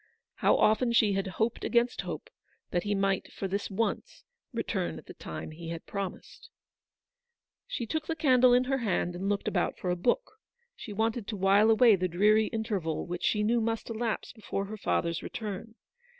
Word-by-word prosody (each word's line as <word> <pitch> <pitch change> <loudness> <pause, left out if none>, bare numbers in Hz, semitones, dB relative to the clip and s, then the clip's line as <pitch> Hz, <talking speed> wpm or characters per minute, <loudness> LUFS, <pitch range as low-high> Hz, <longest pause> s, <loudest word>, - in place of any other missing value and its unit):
How - - +4
often 225 +3 +3
she 215 -3 +4
had 195 0 -1
"hoped 220 +5 -1
against 240 0 +2
hope," - - -6 0.4
that 175 - +1
he 205 0 +1
might, 195 -1 0
for 195 - -4
this 200 +2 -2
once, 220 +3 -2 0.3
return - - -2
at - - -11
the - - -10
time - - -7
he 165 +1 -8
had 165 -1 -6
promised. 200 - -6 1.2
She 235 - -3
took 310 +7 -3
the 325 - -1
candle 255 -5 +5
in 250 +1 +5
her 270 +1 0
hand 185 -6 0
and 190 +3 -2
looked 205 -1 -1
about - - 0
for 180 - -2
a - - +1
book. 435 - -1 0.4
She 220 - -9
wanted 220 +1 -1
to 215 - -4
while 195 +3 +5
away 225 0 +6
the 185 -1 0
dreary 210 +5 +4
interval 205 -8 -2
which 175 0 -5
she 210 -1 +2
knew 230 +2 +2
must 225 +1 -2
elapse 225 0 -2
before 200 -3 -4
her 215 +2 -7
father's 170 -4 0
return. 220 0 -6
215 Hz, 185 wpm, -29 LUFS, 195-235 Hz, 1.2 s, away